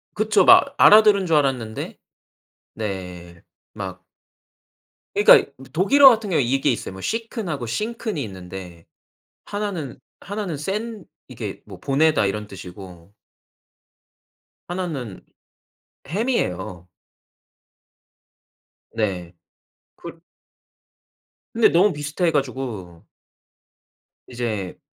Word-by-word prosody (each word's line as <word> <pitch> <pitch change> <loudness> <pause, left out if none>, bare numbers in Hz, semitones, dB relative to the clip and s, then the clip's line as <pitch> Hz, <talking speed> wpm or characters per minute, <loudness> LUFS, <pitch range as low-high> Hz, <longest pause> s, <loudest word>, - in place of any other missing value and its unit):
그쵸. 215 -2 +3
막 - - +6
알아들은 210 -2 +7
줄 165 -2 +3
알았는데 130 -6 -2 0.8
네. 90 -5 -6 0.3
막 - - -7 1.1
그러니까 420 +5 +8
이 410 - -1
뭐 135 - -13
독일어 270 - +7
같은 220 -5 +2
경우는 150 -8 +2
이게 135 +2 +2
있어요. 115 - -3
뭐 95 - -9
쉬큰 225 - -3
하고 140 -7 -3
싱큰 220 - -3
이 145 - -2
있는데 90 -3 -10 0.6
1 205 0 -3
는 155 - -6 0.2
1 200 - -7
나는 200 -7 -3
센 210 +5 -4 0.2
이게 - - -7
뭐 - - -12
보내다 145 -3 +2
이런 105 +2 -3
뜻이고 90 -1 -12 1.6
1 180 +1 -2
는 125 - -7 0.8
햄이에요. 95 - -2 2.1
네. 95 -6 -2 0.6
그 170 -1 -11 1.3
근데 230 0 +5
너무 185 +4 +4
비슷해 150 +4 -1
가지고 125 - -4 1.2
이제 110 -6 -4
140 Hz, 190 characters per minute, -22 LUFS, -, 2.1 s, 그러니까